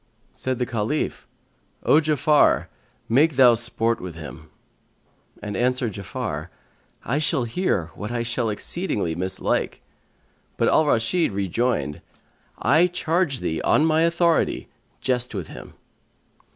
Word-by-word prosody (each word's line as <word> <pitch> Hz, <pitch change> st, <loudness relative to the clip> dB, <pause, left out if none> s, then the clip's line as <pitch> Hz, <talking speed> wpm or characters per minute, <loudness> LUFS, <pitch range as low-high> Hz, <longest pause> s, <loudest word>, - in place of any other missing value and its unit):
Said 130 Hz, -1 st, -1 dB
the 125 Hz, -, 0 dB
Caliph, 115 Hz, +6 st, -2 dB, 0.6 s
"O 150 Hz, -, +5 dB
Ja'afar, 150 Hz, -1 st, +3 dB, 0.4 s
make 145 Hz, +6 st, +3 dB
thou 125 Hz, -2 st, +7 dB
sport 115 Hz, 0 st, 0 dB
with 90 Hz, -3 st, -7 dB
him," 80 Hz, -3 st, -10 dB, 0.9 s
and 105 Hz, -1 st, -4 dB
answered 125 Hz, -1 st, 0 dB
Ja'afar, 100 Hz, -1 st, -5 dB, 0.6 s
"I 140 Hz, +5 st, 0 dB
shall 155 Hz, -3 st, +1 dB
hear 115 Hz, -, -1 dB
what 105 Hz, -, -6 dB
I 120 Hz, -1 st, -1 dB
shall 120 Hz, 0 st, -1 dB
exceedingly 105 Hz, -, -2 dB
mislike."[FN#141] 90 Hz, +3 st, -1 dB, 0.8 s
But -, -, +2 dB
Al 155 Hz, -, +3 dB
Rashid 120 Hz, +7 st, +1 dB
rejoined, 95 Hz, -, -1 dB, 0.6 s
"I 155 Hz, +8 st, +4 dB
charge 170 Hz, -4 st, -1 dB
thee 80 Hz, -, -2 dB
on 155 Hz, -, +3 dB
my 160 Hz, 0 st, +3 dB
authority, 170 Hz, 0 st, +1 dB, 0.3 s
jest 125 Hz, -3 st, -1 dB
with 95 Hz, -5 st, -5 dB
him." -, -, -11 dB
125 Hz, 125 wpm, -23 LUFS, 105-155 Hz, 0.9 s, thou